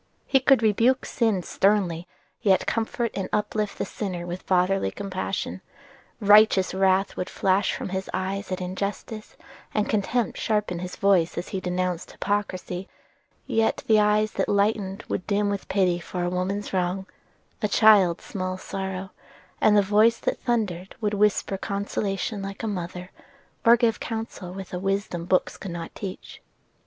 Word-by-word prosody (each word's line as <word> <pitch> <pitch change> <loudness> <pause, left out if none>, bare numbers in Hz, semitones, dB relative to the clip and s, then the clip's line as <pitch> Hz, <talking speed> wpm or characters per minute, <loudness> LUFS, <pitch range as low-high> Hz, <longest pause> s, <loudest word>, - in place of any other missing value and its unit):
He 270 - +4
could 265 -2 +4
rebuke 230 +5 +3
sin 220 -7 0
sternly, 185 -4 +1 0.3
yet 195 -4 +3
comfort 230 +1 -1
and 195 - -3
uplift 210 0 -1
the - - -1
sinner 185 -5 -4
with 175 +1 -5
fatherly 185 - +2
compassion; 190 - -4 0.6
righteous 205 -3 +5
wrath 190 0 +2
would 180 - -3
flash 195 +1 +1
from - - -5
his 190 0 -3
eyes 195 +1 -3
at 185 - -1
injustice, 200 +4 -5 0.4
and 210 - +1
contempt 220 +3 0
sharpen 210 -5 0
his 180 0 -6
voice 190 -4 +2
as 175 - -4
he 190 - -2
denounced 180 -1 -2
hypocrisy: 190 -2 -3 0.6
yet 225 0 +1
the 220 -1 +5
eyes 210 +1 +3
that - - -1
lightened 200 -1 +1
would - - -3
dim 205 0 +1
with 200 -1 -4
pity 185 -3 +2
for 175 +1 -4
a 175 - -1
woman's 190 +3 -2
wrong, 185 +1 0 0.6
a 210 - +2
child's 200 -5 +5
small 185 -1 -4
sorrow; 190 0 -5 0.5
and 210 -1 +5
the 205 - +5
voice 215 +4 +4
that - - -2
thundered 195 -7 -1
would 210 -2 -1
whisper 205 -1 +1
consolation 200 +1 -2
like 195 +3 -6
a - - -1
mother, 180 -2 -5 0.5
or 235 +1 +7
give 235 -2 +2
counsel 220 -5 -5
with 190 0 -8
a 180 - -2
wisdom 195 -3 -2
books 185 +1 +1
cannot 175 -3 -6
teach. 190 -3 -8
195 Hz, 155 wpm, -25 LUFS, 185-210 Hz, 0.6 s, or